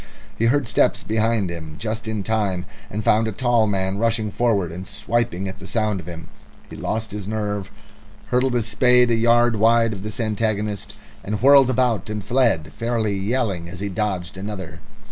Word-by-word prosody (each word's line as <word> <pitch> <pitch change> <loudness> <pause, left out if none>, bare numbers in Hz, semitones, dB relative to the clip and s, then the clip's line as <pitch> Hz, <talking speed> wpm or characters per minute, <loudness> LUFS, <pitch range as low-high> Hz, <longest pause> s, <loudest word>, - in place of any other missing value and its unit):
He 115 - 0
heard 135 +2 +2
steps 115 - +2
behind 110 -3 0
him 80 -2 -7
just 110 +2 -4
in 110 -2 -2
time, 100 -4 -1 0.2
and 105 +2 -4
found 110 +2 +3
a - - -1
tall 120 0 +2
man 95 -1 -1
rushing 110 -2 0
forward 100 -7 +1
and 90 +3 -7
swiping 115 -5 -1
at 95 +1 -7
the 95 - -10
sound 110 -2 0
of 85 - -10
him. 85 -1 -8 0.4
He - - -7
lost 110 0 -3
his 105 -2 -5
nerve, 105 -2 -3 0.6
hurled 125 0 +1
his 120 -3 +1
spade 125 +1 +4
a - - +4
yard 120 0 +3
wide 115 +1 +4
at 100 - -6
his 105 +4 -6
antagonist, 105 -2 -2 0.3
and 105 +1 -3
whirled 140 -1 +7
about 125 -4 +1
and 105 -2 -4
fled, 115 -12 +1
fairly 115 -3 -1
yelling 95 -4 -1
as 90 0 -9
he 100 +1 -3
dodged 95 -4 -3
another. 95 -5 -6
110 Hz, 185 wpm, -22 LUFS, 95-115 Hz, 0.6 s, whirled